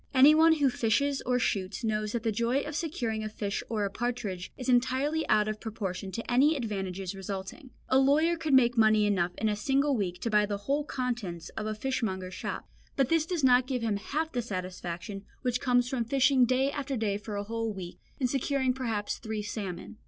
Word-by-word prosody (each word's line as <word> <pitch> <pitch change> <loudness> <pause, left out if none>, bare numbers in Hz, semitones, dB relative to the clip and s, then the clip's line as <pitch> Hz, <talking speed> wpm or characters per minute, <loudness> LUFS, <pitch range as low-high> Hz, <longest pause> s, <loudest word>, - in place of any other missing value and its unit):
Anyone 310 +5 +7
who 285 -4 +2
fishes 270 +5 +1
and 250 0 +2
shoots 195 0 -1
knows 215 -1 -1
that 235 -2 -2
the 225 - +1
joy 235 +5 +1
of 300 0 -6
securing 245 -10 -2
a 215 - -3
fish 205 -1 -3
or 215 -3 0
a 200 - -3
partridge 220 -6 -3
is 255 - -6
entirely 260 +5 +1
out 210 0 +4
of 215 0 -3
proportion 195 -4 -4
to 230 +1 -4
any 280 +6 +5
advantages 195 -6 -3
resulting. 195 - -6 0.2
A 260 - +4
lawyer 305 +5 +4
could 315 -4 +1
make 245 -2 +5
money 215 -2 +5
enough 180 -4 +1
in 220 - 0
a 210 - +1
single 275 +5 +1
week 180 -5 -2
to 230 - -2
buy 210 -1 +4
the 205 -1 -2
whole 280 +9 -1
contents 235 - -3
of 215 - -5
a 215 - -2
fishmonger's 210 -7 -2
shop, - - -5 0.3
but 270 -2 +2
this 325 -1 +2
does 345 -5 -2
not 250 -1 +5
give 255 -3 -2
him 215 -3 0
half 310 +10 -2
the 245 - -1
satisfaction 185 -1 -5 0.2
which 250 -1 0
comes 245 -2 +3
from 250 -2 -1
fishing 260 +1 +4
day 260 +3 +2
after 280 -2 -3
day 210 -3 0
for 210 0 -6
a 200 - -2
whole 225 +1 -2
week, 185 -3 -8 0.2
and 260 - +2
securing 265 0 0
perhaps 225 -5 -2
three 220 -1 -4
salmon. 210 0 -6
230 Hz, 205 wpm, -29 LUFS, 205-265 Hz, 0.3 s, Anyone